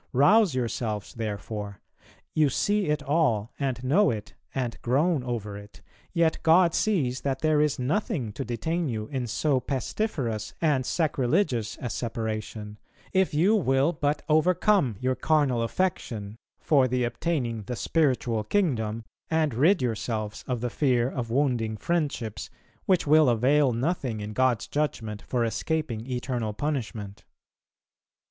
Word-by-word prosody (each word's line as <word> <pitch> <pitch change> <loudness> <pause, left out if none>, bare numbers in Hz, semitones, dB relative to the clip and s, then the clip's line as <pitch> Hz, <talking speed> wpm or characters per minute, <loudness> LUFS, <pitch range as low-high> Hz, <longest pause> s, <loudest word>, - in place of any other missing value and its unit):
Rouse 185 - +5
yourself 110 -4 -2
therefore..... 105 -2 -5 0.5
You 155 -2 +3
see 205 +8 +1
it 150 -1 0
all, 140 -8 +1
and 130 -3 -2
know 175 +11 +4
it, 105 -3 -4 0.2
and 125 -3 -2
groan 145 +4 +1
over 110 -5 -4
it; 105 0 -15 0.3
yet 170 -2 +2
God 170 +1 +5
sees 145 -13 0
that 135 -1 -2
there 155 -1 +3
is 150 -2 +1
nothing 140 - -1
to - - -4
detain 160 +8 -2
you 110 -3 -3
in 130 -3 -3
so 135 +4 +1
pestiferous 130 - -2
and 145 -6 +1
sacrilegious 140 - 0
a 120 - -4
separation, 110 -2 -4 0.3
if 190 -4 +2
you 185 +8 +4
will 140 -3 +2
but 150 -1 -1
overcome 175 - +3
your 130 0 +1
carnal 145 -4 +2
affection, 115 - -2 0.2
for 140 -5 +3
the 125 0 0
obtaining 120 -3 -1
the 125 - -4
spiritual 120 -6 +1
kingdom, 115 - 0 0.3
and 160 -3 +1
rid 160 - +3
yourselves 110 -2 -3
of 125 -3 -2
the 120 -1 -2
fear 125 -3 +1
of 120 -3 -4
wounding 120 -4 0
friendships, 120 - -2 0.4
which 185 -3 +3
will 155 -1 +5
avail 130 +4 +3
nothing 125 -2 -1
in 105 +1 -5
God's 130 -2 +2
judgment 115 -8 -2
for 120 -2 -1
escaping 120 -2 -2
eternal 125 -3 -2
punishment. 110 -6 -4
130 Hz, 140 wpm, -27 LUFS, 115-155 Hz, 0.5 s, Rouse